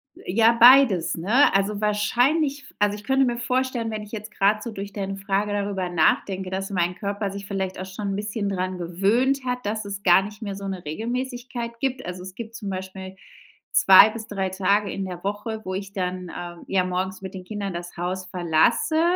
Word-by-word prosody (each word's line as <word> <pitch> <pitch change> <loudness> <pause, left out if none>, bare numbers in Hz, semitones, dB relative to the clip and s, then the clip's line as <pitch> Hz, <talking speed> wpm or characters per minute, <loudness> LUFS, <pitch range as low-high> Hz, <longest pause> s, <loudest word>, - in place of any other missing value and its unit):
Äh, - - -7
ja, 230 +2 +5
beides, 240 -7 +7
ne? 220 - +4
Also 200 +1 +1
wahrscheinlich 260 +8 +1
f - - -16
also, 205 0 +2
ich 210 - -12
könnte 270 +2 +3
mir 240 -1 -1
vorstellen, 250 -2 -1
wenn 215 -1 -4
ich 210 - -13
jetzt 215 -1 -7
grad 210 +1 +2
so 235 - -5
durch 200 -1 -6
deine 195 -1 -4
Frage 195 +1 -1
darüber 200 -3 -2
nachdenke, 185 +3 +1
dass 190 +1 -3
mein 180 -1 0
Körper 200 0 -3
sich 200 0 -7
vielleicht 190 -2 -3
auch 185 - -4
schon 195 +2 -5
'n - - -2
bisschen 205 0 -3
dran 185 -1 -2
gewöhnt 200 +11 +1
hat, 250 -1 -3
dass 215 0 -2
es 200 0 -6
gar 180 +1 +6
nicht 210 +2 -9
mehr 200 -3 -4
so 195 0 -6
'ne 190 -2 -5
Regelmäßigkeit 240 - -4
gibt, 260 0 -2
also, 180 0 -6
es 185 0 -9
gibt 230 -1 -8
zum 210 -4 -5
Beispiel 190 0 -6 0.6
2 195 +2 +8
bis 225 0 -7
3 195 -3 -2
Tage 200 +2 +1
in 195 - -3
der 180 -2 -7
Woche, 205 +2 -3
wo 185 - -4
ich 195 +1 -5
dann, 180 -2 -3
ähm, 175 -1 -8
ja, 190 -1 +2
morgens 185 +1 -3
mit 190 -1 -7
den 185 -1 -8
Kindern 200 -2 -4
das 175 0 -7
Haus 185 +2 -3
verlasse 180 - +2
200 Hz, 210 wpm, -24 LUFS, 185-225 Hz, 0.6 s, 2